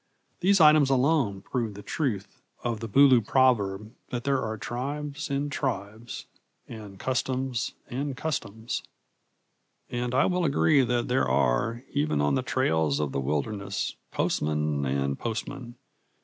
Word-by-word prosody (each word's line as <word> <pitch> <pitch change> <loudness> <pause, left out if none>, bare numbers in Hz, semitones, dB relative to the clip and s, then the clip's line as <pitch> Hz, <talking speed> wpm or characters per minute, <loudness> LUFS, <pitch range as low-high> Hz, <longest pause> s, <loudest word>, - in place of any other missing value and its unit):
These 195 +2 +4
items 150 -3 +7
alone 130 -7 +2
prove 115 -5 -2
the 105 - -9
truth 105 -10 -3 0.2
of 120 -3 -1
the 115 0 -5
Bulu 135 +1 +6
proverb 110 -4 +2 0.2
that 120 -1 -3
there 135 -1 +1
are 110 0 -3
tribes 145 +7 -4
and 140 +1 -1
tribes, 115 -4 -4 0.4
and 105 -4 -9
customs 130 +1 -1
and 135 +1 -3
customs. 120 -7 -3 1.1
And 120 0 -2
I - - +4
will 180 -1 +1
agree 145 -1 +4
that 120 -1 0
there 125 - +2
are, 70 - +1
even 145 - +1
on 75 -1 +2
the - - +2
trails 80 -3 +1
of 75 -2 -1
the 70 - -1
wilderness, 75 +9 -2 0.2
postmen 75 -2 0
and 70 +1 -1
postmen. 120 +2 -5
120 Hz, 135 wpm, -27 LUFS, 100-135 Hz, 1.1 s, items